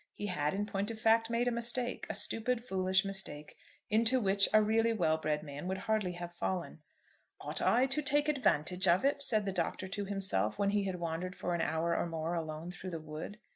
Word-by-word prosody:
He 205 - -5
had, 150 -5 -1
in 205 +1 -1
point 200 0 -2
of 225 -1 -6
fact, 225 +1 +3
made 235 +1 +1
a - - +2
mistake; 240 +1 -2
a - - -3
stupid, 235 +1 0
foolish 190 -3 +1
mistake, 190 -7 -5 0.3
into 230 +4 +3
which 195 -2 +3
a 215 - +7
really 225 +2 +2
well 160 -7 +1
bred 150 -1 -1
man 145 +3 -7
would 190 +1 -1
hardly 215 -3 -1
have 175 0 -7
fallen. 175 -2 -3 0.6
"Ought - - -3
I 245 +3 +4
to 270 +3 0
take 290 +1 +4
advantage 190 - +1
of 175 +8 +4
it?" 280 0 +2
said 215 -6 0
the 195 - -1
Doctor 185 +1 -2
to 200 +1 -3
himself 190 - 0
when 200 0 +1
he 205 -1 +1
had 190 -2 -2
wandered 170 +2 -3
for 175 - -2
an 170 - 0
hour 165 +1 0
or - - 0
more 165 0 -3
alone 160 0 -4
through 180 +1 -7
the 165 -2 -4
wood. 155 +6 -7
195 Hz, 215 wpm, -33 LUFS, 170-225 Hz, 0.6 s, a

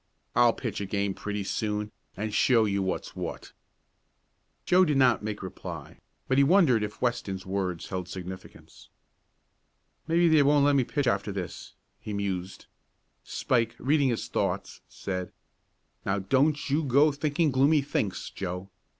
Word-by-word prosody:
"I'll 120 -1 +5
pitch 115 -5 -4
a 100 - -3
game 100 0 -1
pretty 105 +1 -4
soon, 105 +1 -2 0.3
and 105 +1 -3
show 115 -2 +4
you 100 -1 0
what's 95 -1 -3
what." - - -6 1.1
Joe 185 +1 +5
did 150 -6 +2
not 130 -3 +4
make 105 -2 -4
reply, 95 - -8 0.3
but 130 +1 +3
he - - +7
wondered 145 - +4
if 105 +3 -5
Weston's 110 -6 -1
words 95 -3 -3
held 90 -2 -4
significance. 95 0 -10 1.2
"Maybe 170 +1 +4
they 160 -2 +5
won't 145 0 +4
let 145 0 +4
me 130 -3 +3
pitch 145 +2 -1
after 100 -3 0
this," 95 -3 -6 0.2
he 105 - -6
mused. 95 -2 -3 0.6
Spike, 115 -2 0
reading 140 0 +2
his 115 - -2
thoughts, - - -2
said: 90 -2 -5 0.7
"Now 95 +1 0
don't 135 +10 +1
you 155 +3 +2
go 145 +3 +4
to 140 - -11
thinking 150 0 +1
gloomy 140 +3 +4
thinks, 105 -9 -2
Joe. 95 0 -5
115 Hz, 150 wpm, -28 LUFS, 100-140 Hz, 1.2 s, he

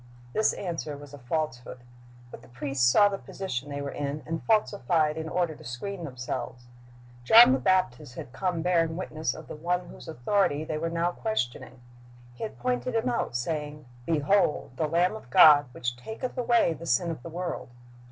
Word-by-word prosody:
This 215 - +2
answer 165 -5 -4
was 145 -1 -12
a 145 - -9
falsehood. 125 -2 -3 0.5
But - - -10
the - - -17
priests 125 0 +1
saw 205 +8 +6
the 195 -1 -3
position 145 -8 -5
they 140 0 -4
were 140 - -4
in, 145 +1 -4
and 165 0 -3
falsified 185 -8 +2
in 160 0 -5
order 175 -2 0
to - - -14
screen 170 +10 -5
themselves. 125 -2 -5 0.6
John 225 - +9
the 130 - +1
Baptist 145 -5 0
had 125 - -8
come 180 -4 -2
bearing 165 -2 +1
witness 155 -6 -3
of 155 - -11
the - - -7
One 175 +3 -2
whose - - -12
authority 155 +2 0
they 155 -1 -3
were 165 +1 -1
now 170 +1 0
questioning. 130 - -3 0.5
He - - -16
had 220 - -5
pointed 250 -1 -2
Him 225 +2 +1
out, 235 - -2
saying, 150 +3 -3 0.2
"Behold 160 +1 +2
the 155 +3 0
Lamb 175 +6 +2
of 220 - -11
God, 150 -6 +8
which 120 0 -3
taketh 220 - -6
away 235 -8 +3
the 165 +2 -9
sin 165 +8 +2
of 155 - -7
the 170 - -8
world."' 175 -3 -5
160 Hz, 185 wpm, -27 LUFS, 140-185 Hz, 0.6 s, John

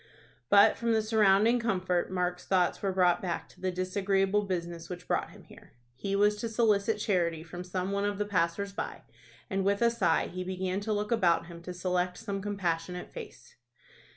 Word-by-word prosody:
But 200 0 +6
from 230 -1 0
the 220 - +3
surrounding 215 +1 +4
comfort 185 -6 0
Mark's 180 -1 -2
thoughts 185 -2 +2
were 195 - 0
brought 180 -2 +3
back 175 -3 -3
to 180 - -20
the 185 - 0
disagreeable 195 +2 +1
business 170 -2 -4
which 180 -1 -7
brought - - 0
him - - -15
here. - - -17 0.2
He 195 +11 -3
was 210 +1 +3
to 230 +2 -3
solicit 220 -2 +2
charity 170 -6 0
from 175 +2 -8
some 185 +1 -3
one 200 0 0
of 205 -1 -1
the 210 - -1
passers 195 +1 0
by, - - -5 0.4
and 195 -2 -1
with 200 +1 +2
a 235 - +4
sigh 185 -8 +2
he 185 +1 -5
began 185 +1 -2
to 210 +2 -3
look 210 +1 -1
about 180 -9 +3
him 170 0 -10
to 180 - -7
select 180 0 -1
some 200 -3 -4
compassionate 180 -3 -3
face. 480 0 -10
190 Hz, 190 wpm, -30 LUFS, 180-205 Hz, 0.4 s, But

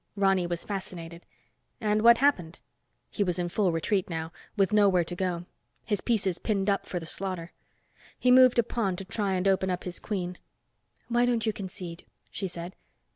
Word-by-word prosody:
Ronny 195 -3 +2
was 175 -1 -3
fascinated. 170 -4 -7 0.5
"And 210 -1 +1
what 235 +1 +7
happened?" 190 - +1 0.5
He 205 - 0
was 180 -2 -1
in 175 -1 -1
full 190 0 +1
retreat 180 +4 0
now, 160 -2 -2
and - - -23
with 195 0 +2
nowhere 200 -4 +5
to 175 +2 -6
go, 180 -2 -2 0.4
his 205 -4 0
pieces 200 -7 0
pinned 200 -2 +1
up 200 - -1
for 180 - -3
the 165 - -8
slaughter. 180 -1 -4 0.7
He 250 - +3
moved 255 -1 +7
a 235 - +5
pawn 215 -5 -1
to 195 - -7
try 200 -1 -1
and 185 +1 0
open 190 -1 +2
up 180 -1 -2
his 180 -1 -5
queen. 180 -4 -4 0.7
"Why 240 +1 +2
don't 235 -2 +1
you 220 - +1
concede?" 185 -4 -8 0.2
she 195 - -3
said. 175 +1 -7
190 Hz, 185 wpm, -28 LUFS, 175-210 Hz, 0.7 s, what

